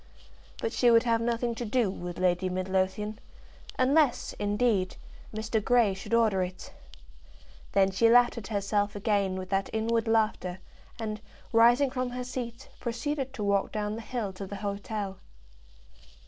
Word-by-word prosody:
But 460 Hz, -, -2 dB
she 245 Hz, -, +4 dB
would 230 Hz, -1 st, +6 dB
have 230 Hz, -2 st, +2 dB
nothing 235 Hz, 0 st, 0 dB
to 230 Hz, -, -5 dB
do 230 Hz, -2 st, +1 dB
with 175 Hz, -2 st, -6 dB
Lady 185 Hz, 0 st, +1 dB
Midlothian, 190 Hz, +3 st, -1 dB, 0.6 s
unless, 275 Hz, 0 st, +2 dB
indeed, 205 Hz, -2 st, +1 dB, 0.4 s
Mr. 220 Hz, 0 st, -2 dB
Grey 235 Hz, -4 st, +4 dB
should 195 Hz, +4 st, -2 dB
order 220 Hz, -5 st, +3 dB
it. 185 Hz, 0 st, -5 dB, 1.0 s
Then 195 Hz, -1 st, +4 dB
she 230 Hz, +4 st, +4 dB
laughed 240 Hz, +1 st, +5 dB
at 230 Hz, -4 st, -7 dB
herself 205 Hz, 0 st, 0 dB
again 200 Hz, -2 st, +1 dB
with 185 Hz, 0 st, -5 dB
that 195 Hz, 0 st, 0 dB
inward 225 Hz, +1 st, 0 dB
laughter, 215 Hz, -5 st, +1 dB, 0.4 s
and, 215 Hz, -2 st, -4 dB, 0.3 s
rising 240 Hz, +4 st, +5 dB
from 255 Hz, -1 st, -2 dB
her 250 Hz, +1 st, -4 dB
seat, 245 Hz, 0 st, -6 dB
proceeded 265 Hz, +3 st, -3 dB
to 210 Hz, -, -4 dB
walk 200 Hz, -1 st, +1 dB
down 210 Hz, -1 st, -2 dB
the 225 Hz, -, -5 dB
hill 225 Hz, -4 st, -4 dB
to 195 Hz, +1 st, -7 dB
the 200 Hz, -, -6 dB
hotel. 200 Hz, -1 st, -4 dB
220 Hz, 150 wpm, -28 LUFS, 195-235 Hz, 1.0 s, would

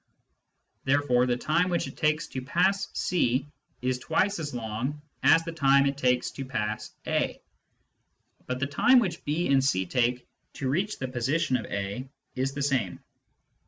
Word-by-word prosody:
Therefore 135 Hz, -3 st, +3 dB
the 120 Hz, -1 st, +1 dB
time 170 Hz, +7 st, +1 dB
which 175 Hz, -2 st, 0 dB
it -, -, -8 dB
takes 155 Hz, 0 st, +1 dB
to 130 Hz, -, -4 dB
pass 190 Hz, +8 st, +1 dB
C 135 Hz, -6 st, +1 dB, 0.4 s
is 125 Hz, 0 st, 0 dB
twice 190 Hz, +8 st, +1 dB
as 150 Hz, -2 st, -4 dB
long 120 Hz, +5 st, -3 dB, 0.2 s
as 165 Hz, -, +5 dB
the 165 Hz, -, -4 dB
time 140 Hz, -3 st, +4 dB
it 140 Hz, 0 st, +1 dB
takes 125 Hz, -2 st, +1 dB
to 135 Hz, -, -6 dB
pass 110 Hz, -5 st, -3 dB
A. -, -, 0 dB, 1.1 s
But 125 Hz, 0 st, -2 dB
the 130 Hz, -, +1 dB
time 155 Hz, -, +4 dB
which 185 Hz, -9 st, +1 dB
B 155 Hz, +4 st, 0 dB
and 135 Hz, -1 st, +4 dB
C 95 Hz, -9 st, +1 dB
take 125 Hz, +4 st, 0 dB, 0.3 s
to 130 Hz, -, -3 dB
reach 190 Hz, +9 st, 0 dB
the 130 Hz, -, -3 dB
position 130 Hz, +4 st, 0 dB
of 110 Hz, -5 st, -2 dB
A 100 Hz, +6 st, -4 dB, 0.2 s
is 135 Hz, +1 st, -2 dB
the 140 Hz, -, -2 dB
same. 130 Hz, -10 st, 0 dB
135 Hz, 165 wpm, -27 LUFS, 125-155 Hz, 1.1 s, as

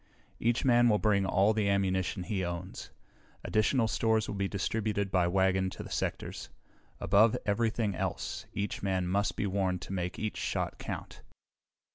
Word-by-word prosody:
Each 120 Hz, +3 st, +1 dB
man 120 Hz, -1 st, +5 dB
will 105 Hz, -, +4 dB
bring 100 Hz, -3 st, +2 dB
all 100 Hz, +3 st, +3 dB
the 105 Hz, -2 st, +1 dB
ammunition 95 Hz, -1 st, 0 dB
he 95 Hz, 0 st, -2 dB
owns. 85 Hz, +2 st, -5 dB, 0.5 s
Additional 110 Hz, +2 st, +2 dB
stores 110 Hz, -1 st, +1 dB
will -, -, -4 dB
be 100 Hz, -1 st, -1 dB
distributed 100 Hz, 0 st, -1 dB
by 90 Hz, -2 st, +3 dB
wagon 95 Hz, +1 st, +2 dB
to -, -, -8 dB
the -, -, -10 dB
sectors. -, -, -3 dB, 0.5 s
Above 110 Hz, +2 st, +4 dB
everything 110 Hz, 0 st, 0 dB
else, -, -, -4 dB
each 100 Hz, 0 st, -3 dB
man 95 Hz, -2 st, 0 dB
must 100 Hz, +3 st, 0 dB
be -, -, -1 dB
warned 95 Hz, -2 st, -1 dB
to 95 Hz, -, -6 dB
make 90 Hz, -1 st, -3 dB
each 110 Hz, -1 st, -3 dB
shot -, -, -2 dB
count." -, -, -6 dB
100 Hz, 160 wpm, -30 LUFS, 95-110 Hz, 0.5 s, man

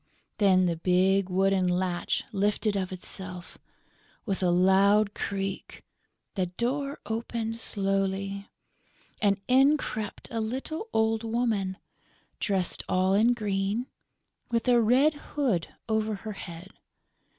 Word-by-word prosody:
Then 190 Hz, -3 st, +5 dB
the 170 Hz, -2 st, 0 dB
big 185 Hz, +2 st, +2 dB
wooden 190 Hz, 0 st, +2 dB
latch 180 Hz, 0 st, 0 dB
lifted 205 Hz, +1 st, 0 dB
of 190 Hz, -2 st, -2 dB
itself, 180 Hz, -1 st, -8 dB, 0.7 s
with 195 Hz, -4 st, -2 dB
a 180 Hz, -, +3 dB
loud 195 Hz, +4 st, +4 dB
creak; 195 Hz, -1 st, -4 dB, 0.5 s
the 185 Hz, -3 st, -1 dB
door 270 Hz, -, -2 dB
opened 225 Hz, 0 st, -3 dB
slowly; 195 Hz, -1 st, -1 dB, 0.7 s
and 200 Hz, -2 st, +3 dB
in 270 Hz, +4 st, +5 dB
crept 215 Hz, -6 st, -5 dB
a 225 Hz, -, -1 dB
little 270 Hz, -, -4 dB
old 220 Hz, 0 st, +1 dB
woman, 220 Hz, -5 st, -1 dB, 0.6 s
dressed 190 Hz, -4 st, 0 dB
all 185 Hz, +1 st, +2 dB
in 230 Hz, +4 st, +4 dB
green, 205 Hz, +1 st, -1 dB, 0.6 s
with 235 Hz, +1 st, -1 dB
a 240 Hz, -1 st, +5 dB
red 260 Hz, +7 st, +4 dB
hood 270 Hz, -, -1 dB, 0.2 s
over 220 Hz, -1 st, 0 dB
her 215 Hz, +2 st, -6 dB
head. 180 Hz, 0 st, -9 dB
200 Hz, 115 wpm, -28 LUFS, 190-230 Hz, 0.7 s, Then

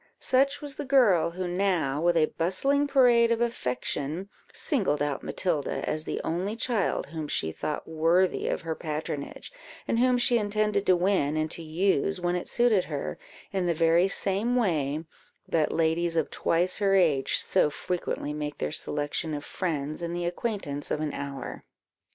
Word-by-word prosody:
Such 275 Hz, +2 st, +2 dB
was 290 Hz, -2 st, -6 dB
the 295 Hz, -, -3 dB
girl 225 Hz, -, +4 dB
who 180 Hz, +2 st, -4 dB
now, 175 Hz, -6 st, 0 dB
with 175 Hz, 0 st, +3 dB
a 155 Hz, -, +5 dB
bustling 275 Hz, -, +1 dB
parade 240 Hz, -4 st, +5 dB
of 230 Hz, -, +2 dB
affection, 160 Hz, -, -2 dB, 0.2 s
singled 200 Hz, -, +1 dB
out 145 Hz, -2 st, -1 dB
Matilda 160 Hz, -6 st, -1 dB
as 155 Hz, 0 st, -1 dB
the -, -, -3 dB
only 185 Hz, +6 st, -2 dB
child 230 Hz, -4 st, 0 dB
whom 155 Hz, 0 st, -6 dB
she 80 Hz, -, -1 dB
thought 150 Hz, -, -4 dB
worthy 165 Hz, +4 st, +2 dB
of -, -, -1 dB
her 165 Hz, -1 st, -2 dB
patronage, 150 Hz, -2 st, -5 dB, 0.4 s
and 230 Hz, -, +1 dB
whom 250 Hz, 0 st, +4 dB
she 245 Hz, -1 st, +3 dB
intended 210 Hz, -1 st, 0 dB
to 185 Hz, -, +6 dB
win 175 Hz, -5 st, +1 dB
and 155 Hz, 0 st, -1 dB
to -, -, -6 dB
use, 180 Hz, +3 st, 0 dB
when 175 Hz, 0 st, 0 dB
it 180 Hz, -, -3 dB
suited 235 Hz, -6 st, +3 dB
her, 145 Hz, -3 st, -4 dB, 0.3 s
in 185 Hz, -2 st, 0 dB
the 170 Hz, -, +1 dB
very 165 Hz, +3 st, +4 dB
same 200 Hz, +5 st, 0 dB
way 160 Hz, -, 0 dB, 0.4 s
that 155 Hz, -2 st, +1 dB
ladies 165 Hz, +1 st, +1 dB
of 160 Hz, -3 st, 0 dB
twice 175 Hz, +4 st, +1 dB
her 195 Hz, -1 st, +3 dB
age 155 Hz, -8 st, +3 dB
so -, -, +3 dB
frequently 150 Hz, -2 st, -3 dB
make 150 Hz, -1 st, -4 dB
their 75 Hz, -, -2 dB
selection 150 Hz, -, -2 dB
of 145 Hz, -, -6 dB
friends 155 Hz, -4 st, -3 dB
in 170 Hz, 0 st, -3 dB
the 175 Hz, 0 st, -2 dB
acquaintance 175 Hz, -6 st, -3 dB
of -, -, -1 dB
an 155 Hz, -2 st, -2 dB
hour. 140 Hz, -2 st, -6 dB
175 Hz, 170 wpm, -27 LUFS, 155-205 Hz, 0.4 s, to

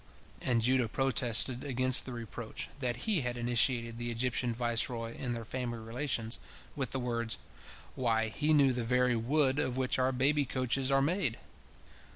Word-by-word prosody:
And 120 Hz, -3 st, +1 dB
Judah 125 Hz, 0 st, +2 dB
protested 125 Hz, -1 st, +3 dB
against 130 Hz, -2 st, +3 dB
the 130 Hz, -, -6 dB
reproach, 120 Hz, -2 st, -6 dB
that 120 Hz, -3 st, -3 dB
he 210 Hz, -8 st, +2 dB
had 125 Hz, -1 st, -3 dB
initiated 120 Hz, -1 st, +1 dB
the 120 Hz, 0 st, -3 dB
Egyptian 120 Hz, +1 st, -1 dB
viceroy 115 Hz, 0 st, -1 dB
in 125 Hz, -2 st, -3 dB
their 115 Hz, -1 st, -6 dB
family 120 Hz, 0 st, -4 dB
relations, 115 Hz, 0 st, -2 dB, 0.4 s
with 135 Hz, -4 st, -2 dB
the 135 Hz, -, -2 dB
words: 115 Hz, -2 st, -2 dB, 0.6 s
"Why, 115 Hz, -3 st, 0 dB
he 150 Hz, +7 st, -1 dB
knew 140 Hz, -4 st, +4 dB
the 120 Hz, -1 st, -2 dB
very 125 Hz, +1 st, +2 dB
wood 135 Hz, +4 st, +1 dB
of 130 Hz, -2 st, -1 dB
which 130 Hz, 0 st, 0 dB
our 130 Hz, +1 st, +2 dB
baby 140 Hz, +3 st, +2 dB
coaches 130 Hz, 0 st, -1 dB
are 135 Hz, 0 st, +3 dB
made! 155 Hz, -, +1 dB
125 Hz, 165 wpm, -31 LUFS, 115-130 Hz, 0.6 s, knew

